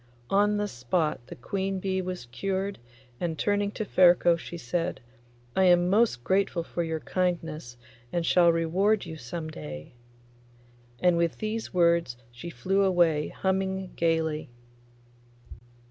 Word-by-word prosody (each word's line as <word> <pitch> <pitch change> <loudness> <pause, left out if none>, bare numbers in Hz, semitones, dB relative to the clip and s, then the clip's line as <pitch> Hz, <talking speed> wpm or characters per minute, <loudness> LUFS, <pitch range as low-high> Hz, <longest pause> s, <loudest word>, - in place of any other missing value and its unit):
On 205 +1 +3
the 205 0 0
spot 130 -2 -2
the - - -8
queen 190 +8 -3
bee 190 0 -1
was 180 -7 -5
cured, 195 +10 -3 0.4
and 165 -2 -2
turning 205 +2 +1
to 215 - -3
Ferko 175 -2 +5
she 170 +1 -8
said, 170 +6 -2 0.6
'I 190 - +3
am 175 0 +5
most 210 - +2
grateful 190 -1 +1
for 170 - -4
your 160 -1 -2
kindness, 165 -8 -2 0.3
and 170 -1 -1
shall 175 -1 +5
reward 185 +6 +1
you 160 -1 -7
some 155 +4 -6
day.' 75 - -8 1.1
And 180 -1 +4
with 170 -1 0
these 220 +1 -3
words 170 -7 +2
she 120 +9 -8
flew 195 +3 0
away 170 -5 +3
humming, 190 0 -2
gaily. 160 -3 0
175 Hz, 135 wpm, -27 LUFS, 160-190 Hz, 1.1 s, Ferko